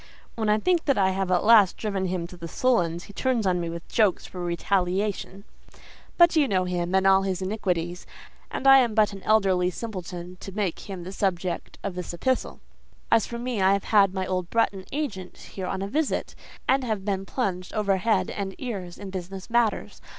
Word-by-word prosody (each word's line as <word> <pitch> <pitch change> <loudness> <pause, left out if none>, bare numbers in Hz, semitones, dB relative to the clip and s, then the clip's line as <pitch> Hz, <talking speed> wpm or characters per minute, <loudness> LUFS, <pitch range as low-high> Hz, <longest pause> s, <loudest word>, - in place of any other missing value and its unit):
When 220 -2 -1
I 210 - +4
think 340 +6 +1
I 195 -8 +3
have 190 0 -2
at 180 -1 +2
last 210 -4 +6
driven 200 -3 -2
him 180 -1 -2
to 180 - -11
the 170 -1 -7
sullens, 175 -6 +1
he 205 - -13
turns 245 -1 0
on 180 -2 +1
me 170 - -3
with 170 0 -7
jokes 210 -5 +2
for 180 -1 -7
retaliation: 190 +3 -1 0.7
but 345 0 +6
you 300 -3 +4
know 185 -5 +1
him 180 0 -1
and 190 0 +3
all 195 0 +6
his 190 -1 -2
iniquities, 180 -3 -2 0.4
and - - -5
I 270 0 +9
am 235 -4 +1
but 210 -2 +3
an 195 - -9
elderly 190 -4 +3
simpleton 180 -3 -7
to 195 - -8
make 200 -2 -3
him 185 -3 -6
the 185 - -7
subject 185 -3 -2
of 200 - -3
this 180 -1 -5
epistle. 260 +8 -1 0.5
"As 225 -2 +4
for 235 - -5
me, 240 -3 -2
I 190 +1 +5
have 200 - 0
had 200 -3 +4
my 190 -1 -2
old 185 -2 -2
Bretton 200 -5 0
agent 230 -11 -4
here 190 -2 -7
on 190 +1 -3
a - - -3
visit, 300 +8 -1 0.3
and 265 0 +3
have 215 -5 -2
been 195 -2 -1
plunged 190 -5 -3
overhead 205 +1 +1
and 195 -1 -4
ears 195 -9 -5
in 200 -2 -8
business 190 +3 -7
matters. 235 -3 0
195 Hz, 200 wpm, -25 LUFS, 180-220 Hz, 0.7 s, I